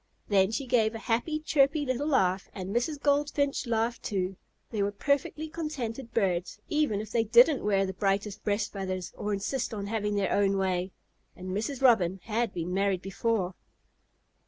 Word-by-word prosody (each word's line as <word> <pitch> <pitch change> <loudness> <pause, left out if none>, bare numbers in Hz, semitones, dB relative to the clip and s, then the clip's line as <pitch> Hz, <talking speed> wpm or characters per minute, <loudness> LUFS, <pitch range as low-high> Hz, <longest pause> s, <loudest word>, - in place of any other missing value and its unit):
Then 195 -2 +4
she 225 +5 -2
gave 230 -3 +2
a 225 - -8
happy, 250 +7 0
chirpy 290 0 +2
little 255 +3 -1
laugh, 190 -10 +2
and 195 +2 -5
Mrs. 280 +5 0
Goldfinch 285 -1 +1
laughed, 230 +1 0
too. 190 -2 -2 0.4
They 215 -3 -1
were 200 +1 +1
perfectly 280 +7 -1
contented 270 -7 -5
birds, 185 -3 0
even 300 -10 +1
if 215 0 -9
they 230 - +2
didn't 240 +6 +5
wear 195 -2 +2
the 190 - -4
brightest 195 +2 -1
breast 205 0 -1
feathers 185 -2 -4
or 210 - -3
insist 225 +4 -2
on 200 -1 -4
having 210 -1 -1
their 200 -2 0
own 200 -1 +2
way. 185 -1 0 0.4
And 185 0 -8
Mrs. 235 +7 -3
Robin 195 -7 +4
had 230 0 -1
been 175 0 -4
married 195 -1 +1
before. 195 0 -1
215 Hz, 170 wpm, -29 LUFS, 195-255 Hz, 0.4 s, didn't